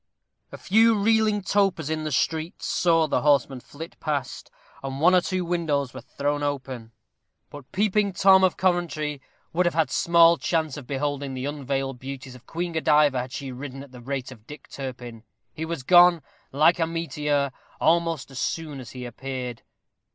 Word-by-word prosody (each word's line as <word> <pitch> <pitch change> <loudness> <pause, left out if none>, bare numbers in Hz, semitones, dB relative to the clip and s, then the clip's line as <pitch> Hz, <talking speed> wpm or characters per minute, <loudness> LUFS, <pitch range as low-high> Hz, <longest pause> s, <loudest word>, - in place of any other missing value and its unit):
A - - -8
few 225 +3 +4
reeling 215 -1 +2
topers 195 -6 +1
in 155 0 -2
the 155 - -3
streets 160 +4 -1
saw 165 -2 +2
the 155 - 0
horseman 140 -3 +2
flit 160 +6 -11
past, 145 -5 -3 0.3
and 135 0 -5
one 175 +4 +5
or 180 - +5
two 185 0 -2
windows 150 -7 -1
were 130 - -8
thrown 145 +4 -2
open; 130 -5 -4 0.6
but 145 -3 -12
Peeping 205 0 +1
Tom 190 +1 +5
of 185 - +2
Coventry 155 -6 -1 0.3
would 175 +1 +2
have 175 - -1
had 160 -2 +1
small 170 0 +5
chance 160 -4 -1
of 140 -4 -9
beholding 140 0 -3
the 130 +1 -4
unveiled 135 -2 -3
beauties 135 0 -8
of 125 -1 -16
Queen 175 +1 -3
Godiva 150 -4 +3
had 125 0 -8
she 140 -1 -6
ridden 135 +1 -7
at 140 - -15
the 125 -1 -12
rate 130 +1 -4
of 115 -3 -15
Dick 150 -1 -11
Turpin. 125 -4 -7 0.3
He 160 - -5
was 165 -5 -5
gone, 175 0 +6 0.3
like 155 +5 +4
a 165 - +1
meteor, 150 -4 -1 0.3
almost 165 -3 +1
as 130 - -7
soon 155 -4 -3
as 120 -4 -10
he 125 -1 -7
appeared. 125 0 -6
150 Hz, 175 wpm, -25 LUFS, 135-170 Hz, 0.6 s, gone